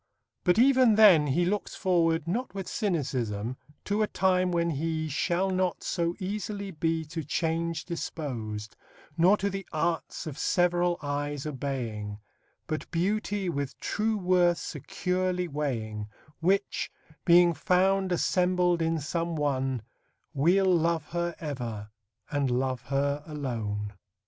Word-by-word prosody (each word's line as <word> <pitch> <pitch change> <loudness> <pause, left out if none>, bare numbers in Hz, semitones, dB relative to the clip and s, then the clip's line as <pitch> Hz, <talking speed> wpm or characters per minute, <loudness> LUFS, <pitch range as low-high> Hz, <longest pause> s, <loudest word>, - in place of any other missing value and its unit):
But 180 -1 +3
even 255 -2 +6
then 190 -9 +7
he 170 +6 +2
looks 205 +3 -2
forward, 165 -3 +2
not 235 +6 -2
with 195 -2 -4
cynicism, 130 - -2 0.3
to 205 +1 0
a 215 - +3
time 185 -2 +2
when 170 -1 +1
he 160 +1 -1
Shall 175 +5 0
not 185 -1 0
so 170 -1 -1
easily 200 0 -4
be 160 0 -1
to 160 +1 -5
change 165 +2 -1
dispos'd, 115 - -5 0.4
Nor 180 +5 +5
to 200 - -1
the 195 +1 -4
arts 165 +1 -2
of 150 -3 -6
several 175 -1 +2
eyes 145 0 -2
obeying; 120 -8 -4 0.5
But 155 - -4
beauty 200 +2 0
with 140 -5 -3
true 215 +1 0
worth 180 -2 +3
securely 180 0 -2
weighing, 115 -9 -3 0.3
Which, 195 +4 0 0.3
being 175 0 +6
found 190 +3 +2
assembled 180 0 +2
in 165 0 +1
some 165 +3 -2
one, 135 -5 0 0.5
We'll 175 +7 +3
love 170 -3 +2
her 170 0 -2
ever, 120 -9 -5 0.4
and 145 -2 +1
love 130 0 0
her 140 +1 0
alone. 110 -9 -3
165 Hz, 130 wpm, -28 LUFS, 140-185 Hz, 0.5 s, then